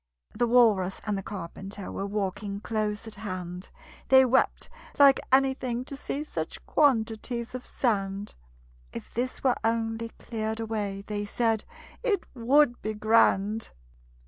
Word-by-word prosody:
The 240 - +1
Walrus 215 -6 +4
and 210 -1 0
the 195 - -2
Carpenter 195 +1 -7
Were 195 - -3
walking 200 0 -3
close 215 -1 -2
at 220 - -8
hand; 185 -4 -6 0.4
They 265 0 +8
wept 260 +1 +2 0.3
like 280 -1 +7
anything 260 -2 +2
to 280 - -6
see 280 +1 -3
Such 305 - -5
quantities 235 -3 +1
of 255 0 -6
sand: 200 -4 -1 0.6
"If - - -9
this 250 +2 -3
were 255 -2 +3
only 225 0 -1
cleared 220 -1 -4
away," 210 -3 -3
They 205 -1 -3
said, 225 +1 0 0.4
"It 430 -7 +1
would 255 +1 +3
be 215 0 -3
grand!" 215 0 +3
225 Hz, 135 wpm, -27 LUFS, 205-245 Hz, 0.6 s, They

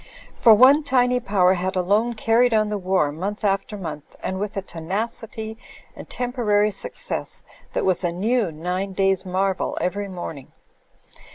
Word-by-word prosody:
For 225 -3 +8
one 265 +7 +7
tiny 250 -3 +2
power 195 -5 +3
had 185 +1 -2
alone 205 +6 +1
carried 230 +2 +3
on 215 -1 +2
the 210 - -1
war 185 -5 +1
month 195 +8 -5
after 200 +1 0
month, 165 -6 -7
and 190 0 -2
with 205 0 -4
a 195 - -2
tenacity 220 +5 -4 0.4
and - - -11
tempo 245 0 -3
rary 210 -1 +3
success 200 - -4 0.3
that - - 0
was 185 -1 +1
a 175 - +1
new 210 +2 0
nine 180 +5 -3
days 195 -1 +1
marvel 190 +1 -1
every 200 +3 -2
morning. 175 -7 -8
200 Hz, 160 wpm, -23 LUFS, 185-225 Hz, 0.4 s, For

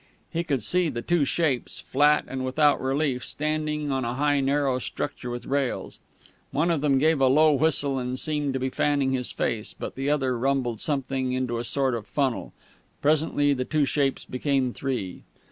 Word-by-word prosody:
He 170 0 -1
could 140 -9 -1
see 180 +7 +2
the 120 -4 -4
two 170 -1 +2
shapes, 140 -4 0
flat 150 +1 +3
and 130 -1 -4
without 145 +3 +3
relief, 135 -1 0
standing 150 -1 -2
on 135 -1 0
a 120 +1 -2
high 145 +1 +2
narrow 135 -1 +1
structure 125 - -5
with 120 0 -5
rails. 135 -2 -2 0.5
One 160 +6 +1
of 160 -4 0
them 140 -2 +3
gave 155 +1 +3
a 135 - +5
low 155 +4 +5
whistle, 140 -2 +1
and 125 0 -3
seemed 150 -2 -1
to - - 0
be 130 +1 -1
fanning 140 -2 +1
his 125 -2 -1
face; 115 -2 -2
but - - -5
the 135 +2 -2
other 135 -4 +1
rumbled 130 -3 0
something 135 -3 -1
into 125 -2 -1
a - - -3
sort 130 +3 0
of 115 -3 -4
funnel. 135 -4 -1 0.5
Presently 145 -1 +2
the 130 -2 -1
two 150 +2 +1
shapes 135 0 0
became 130 -1 0
three. 125 -10 -4
135 Hz, 185 wpm, -26 LUFS, 130-150 Hz, 0.5 s, a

